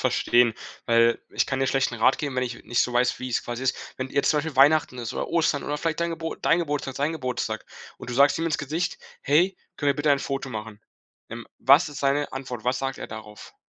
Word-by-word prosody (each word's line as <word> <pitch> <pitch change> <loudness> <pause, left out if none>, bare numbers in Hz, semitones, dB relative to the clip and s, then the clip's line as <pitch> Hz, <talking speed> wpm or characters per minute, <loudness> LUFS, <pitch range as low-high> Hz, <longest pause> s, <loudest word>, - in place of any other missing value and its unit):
verstehen, 120 -2 +3 0.3
weil 115 0 +4
ich - - +1
kann 130 - -2
dir 135 - +1
schlecht 135 0 +1
'n 115 - -7
Rat 130 +4 +4
geben, 140 -4 -3
wenn 125 - +1
ich 120 -1 -7
nicht 120 +4 +1
so 125 - +1
weiß, 125 +1 +2
wie's 130 -1 -2
quasi 120 +2 -5
ist. 130 - +1 0.2
Wenn 130 0 -4
jetzt 140 - +2
zum 150 - +2
Beispiel 155 -1 -3
Weihnachten 145 -1 +4
ist 115 -2 -4
oder - - -3
Ostern 165 -3 +1
oder 145 - -2
vielleicht 165 +1 -2
dein 170 0 0
Geburt 165 0 -5
dein 165 - +3
Geburtstag, 145 -4 -3
sein 145 +4 0
Geburtstag, 125 -6 -3 0.3
und 125 - -9
du - - -3
sagst 140 +4 +4
ihm 165 - -1
ins 155 - 0
Gesicht: 155 +5 -2 0.3
„Hey, 175 +7 +3 0.2
können 145 - 0
wir 140 - -1
bitte 145 0 +1
ein 140 - +2
Foto 135 -1 -3
machen?” 110 -1 -7 0.5
Ähm, 115 0 -7
was 140 +6 +5
ist 145 - -8
seine 140 +1 0
Antwort? 125 -4 -6
Was 125 +1 +1
sagt 135 0 -3
er - - -6
darauf? 105 -1 -10
135 Hz, 240 wpm, -25 LUFS, 120-145 Hz, 0.5 s, was